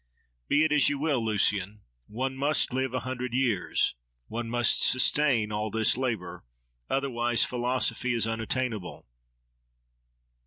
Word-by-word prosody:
—Be 150 +2 +3
it 155 - +1
as 150 -2 +5
you 145 - -1
will, 140 -5 0
Lucian! 105 -1 0 0.3
One 130 +4 -3
must 140 0 +1
live 130 0 -1
a 130 - -2
hundred 125 -1 -4
years: 120 -8 +1 0.4
one 115 0 -4
must 120 0 +2
sustain 130 -4 +2
all 105 +1 -2
this 110 +1 +2
labour; 110 -9 -3 0.5
otherwise 120 -4 +1
philosophy 125 0 -1
is 115 - +2
unattainable. 115 -2 -3
120 Hz, 125 wpm, -27 LUFS, 110-130 Hz, 0.5 s, as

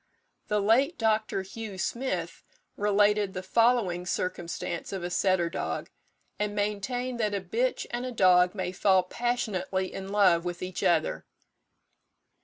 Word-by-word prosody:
The 210 - +1
late 255 - +3
Dr. 215 -3 +1
Hugh 205 0 -7
Smith 185 -7 -3 0.3
related 205 -1 +2
the 185 - -4
following 210 -5 +2
circumstance 175 -2 -3
of 190 -3 -4
a 175 - -3
setter 185 -2 +2
dog, 170 - -4 0.5
and 210 0 -1
maintained 235 +5 -2
that 210 -2 0
a - - 0
bitch 230 +8 -1
and 240 +1 -3
a 255 - -4
dog 180 -4 +4
may 185 -2 -2
fall 190 0 +3
passionately 190 -4 -2
in 195 0 -6
love 190 -5 +4
with 175 0 -4
each 185 0 -4
other. 160 -2 +1
200 Hz, 140 wpm, -28 LUFS, 185-220 Hz, 0.5 s, dog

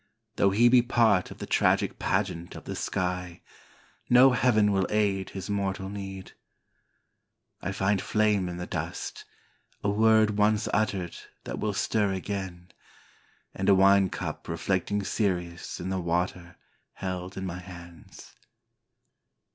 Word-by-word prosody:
Though 100 - +4
he 110 +5 +4
be 125 0 +6
part 115 -6 +2
of - - -10
the - - -6
tragic - - +1
pageant 85 +1 -2
of - - -9
the - - -6
sky, 90 -1 -3 0.7
no 125 +2 +7
heaven 110 -4 +3
will 95 -2 +1
aid 100 -3 0
his 95 -2 -7
mortal 95 -2 -2
need. 95 -2 -7 1.3
I 95 - -3
find 95 0 +1
flame 105 -4 +1
in 85 - -6
the 90 - -4
dust, - - -5 0.6
a 100 - +1
word 110 0 +3
once 105 +1 +2
uttered 100 -4 0 0.3
that - - -5
will 105 -1 -1
stir 105 0 0
again, 95 -2 -5 0.8
And 95 - -1
a 100 - +7
wine 95 0 +5
cup - - -5
reflecting 95 +4 -1
Sirius 90 -4 -2
in 90 - -4
the 95 -1 -1
water 90 +1 -2 0.4
held 95 0 -5
in 95 - -4
my 90 -1 -5
hands. 85 -2 -12
95 Hz, 140 wpm, -27 LUFS, 90-105 Hz, 1.3 s, no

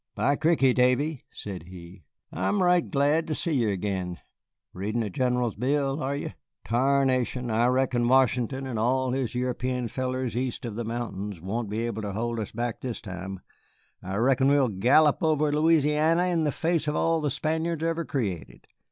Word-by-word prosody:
"By 130 +7 +2
cricky, 150 -4 +3
Davy," 125 +4 +1
said 95 -5 -7
he, 90 -2 -12 0.3
"I'm 185 - 0
right 180 -1 +3
glad 150 +3 +2
ter 155 - -1
see 170 - -2
ye 120 -8 +2
ag'in. 95 -2 -3 0.6
Readin' 105 +5 -2
the 105 -3 -3
General's 125 -1 0
bill, 135 +4 0
are 135 +2 -1
ye? 145 - -5 0.3
Tarnation, 130 -1 +1
I 115 +2 +3
reckon 125 -2 +1
Washington 130 0 +2
and 120 -4 -3
all 130 +3 +1
his 130 -2 -2
European 125 -1 -2
fellers 130 0 -3
east 125 0 -3
of 115 - -4
the 120 +3 -4
mountains 105 -5 -4
won't 100 +5 -3
be 110 +3 -2
able 110 -2 -3
ter 100 -2 -4
hold 115 +2 -2
us 105 - -4
back 120 0 -3
this 125 -3 -4
time. 95 -1 -7 0.6
I 95 +1 -5
reckon 130 +4 +3
we'll 140 -3 +4
gallop 130 +10 +4
over 155 -2 +2
Louisiany 160 +3 +3
in 165 -2 +1
the 150 - +1
face 165 +1 0
of 150 - 0
all 165 -1 +1
the 150 - 0
Spaniards 160 +3 -1
ever 165 0 0
created. 105 - -4
125 Hz, 175 wpm, -26 LUFS, 110-145 Hz, 0.6 s, we'll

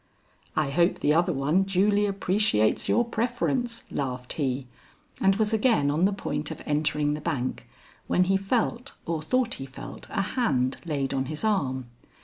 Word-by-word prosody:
"I 150 -3 +1
hope 170 +5 +3
the 150 - +2
other 175 +3 +3
one 150 +5 +2
duly 200 +2 +2
appreciates 195 - +1
your 240 - +3
preference," 240 +1 -1
laughed 125 -2 -3
he, 135 -3 -1 0.6
and 195 0 +4
was 215 +1 +1
again 220 - +3
on 160 +5 +2
the 200 - +3
point 150 -6 -3
of - - -6
entering 150 0 +1
the 150 - -4
bank 145 -6 -2 0.4
when 180 - +3
he 190 +2 +2
felt 235 +5 0
or 165 -2 -2
thought 245 +8 +1
he 135 - -5
felt 135 - -9
a 195 - 0
hand 130 - +1
laid 140 -4 -1
on 135 -1 0
his 155 +5 -5
arm. 140 - 0
170 Hz, 165 wpm, -27 LUFS, 140-210 Hz, 0.6 s, and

